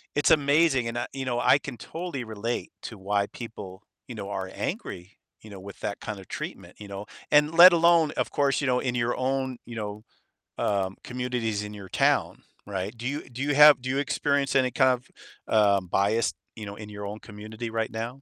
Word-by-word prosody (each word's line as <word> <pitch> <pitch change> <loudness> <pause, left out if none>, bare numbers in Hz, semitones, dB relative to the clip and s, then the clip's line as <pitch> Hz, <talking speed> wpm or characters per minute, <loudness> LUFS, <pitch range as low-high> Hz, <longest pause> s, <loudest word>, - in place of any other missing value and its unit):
it's 145 - +3
amazing 145 -4 +4
and 115 +1 -4
I - - -2
you 135 -1 -4
know, 120 -1 -1
I 130 - +5
can 130 -4 -8
totally 165 0 -5
relate 110 +2 -4
to 110 - -7
why 100 +1 0
people, 105 -5 -9 0.2
you 120 - -8
know, 100 -1 -6
are 95 -1 -4
angry, 90 +3 -5 0.3
you 110 - -12
know, 95 - -9
with 100 +1 -11
that 100 - -3
kind 105 -3 -6
of 95 - -13
treatment, - - -7
you 105 - -9
know? 100 +1 -7 0.3
And 150 +2 +5
let 175 +1 +11
alone, 170 -2 +4
of - - -1
course, 140 -1 +1
you - - -1
know, 125 0 +2
in 125 -2 -2
your 120 0 0
own, 130 -1 -1
you 120 -1 -9
know, 105 0 -5 0.6
um, 95 -2 0
communities 120 -4 -2
in 105 0 -7
your 100 -2 -10
town, - - +1 0.2
right? 100 +3 -4
Do 120 +2 -4
you 145 +2 -4
do 125 +2 -7
you 145 -1 0
have 150 -3 +8
do 130 - -5
you 135 - 0
experience 140 -1 0
any 130 -1 +4
kind 130 0 +3
of, - - -29 0.5
um, 100 -4 +4
bias, 105 +6 +1 0.2
you 110 -2 -7
know, 100 - -7
in 105 0 -9
your 105 -1 -7
own 105 +1 -6
community 110 +2 -8
right 115 -1 -2
now? 115 +4 -5
115 Hz, 215 wpm, -26 LUFS, 105-135 Hz, 0.6 s, let